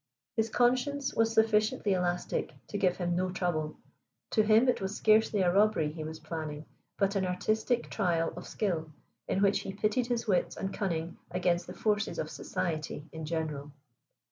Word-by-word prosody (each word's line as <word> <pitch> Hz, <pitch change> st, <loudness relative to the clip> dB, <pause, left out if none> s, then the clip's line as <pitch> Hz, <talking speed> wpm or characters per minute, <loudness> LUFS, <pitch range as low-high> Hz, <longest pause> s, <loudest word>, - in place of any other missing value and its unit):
His 225 Hz, 0 st, +1 dB
conscience, 255 Hz, +4 st, +1 dB
was 225 Hz, 0 st, +2 dB
sufficiently 215 Hz, -2 st, +3 dB
elastic 180 Hz, -1 st, -1 dB
to 205 Hz, -, -2 dB
give 180 Hz, -2 st, +2 dB
him 175 Hz, -1 st, 0 dB
no 185 Hz, +1 st, 0 dB
trouble. 175 Hz, -4 st, -2 dB, 0.5 s
To 220 Hz, -, +4 dB
him 220 Hz, +4 st, +5 dB
it 250 Hz, -, +2 dB
was 195 Hz, +2 st, -2 dB
scarcely 215 Hz, -1 st, +4 dB
a 175 Hz, -1 st, +3 dB
robbery 200 Hz, -7 st, +3 dB
he 155 Hz, 0 st, -6 dB
was 160 Hz, +1 st, -6 dB
planning, 155 Hz, -1 st, -5 dB, 0.3 s
but 200 Hz, 0 st, +1 dB
an 195 Hz, -, +1 dB
artistic 215 Hz, +6 st, 0 dB
trial 170 Hz, -5 st, 0 dB
of 180 Hz, -, -8 dB
skill, 165 Hz, -7 st, -2 dB, 0.4 s
in 195 Hz, -, +1 dB
which 200 Hz, 0 st, +4 dB
he 195 Hz, -, -5 dB
pitted 215 Hz, +4 st, 0 dB
his 240 Hz, -1 st, -1 dB
wits 190 Hz, -4 st, +1 dB
and 195 Hz, 0 st, -3 dB
cunning 170 Hz, -4 st, -2 dB
against 175 Hz, -1 st, 0 dB
the -, -, -8 dB
forces 215 Hz, -, 0 dB
of -, -, -3 dB
society 155 Hz, -3 st, -3 dB
in 160 Hz, -1 st, -6 dB
general. 150 Hz, -3 st, -3 dB
190 Hz, 170 wpm, -30 LUFS, 165-215 Hz, 0.5 s, him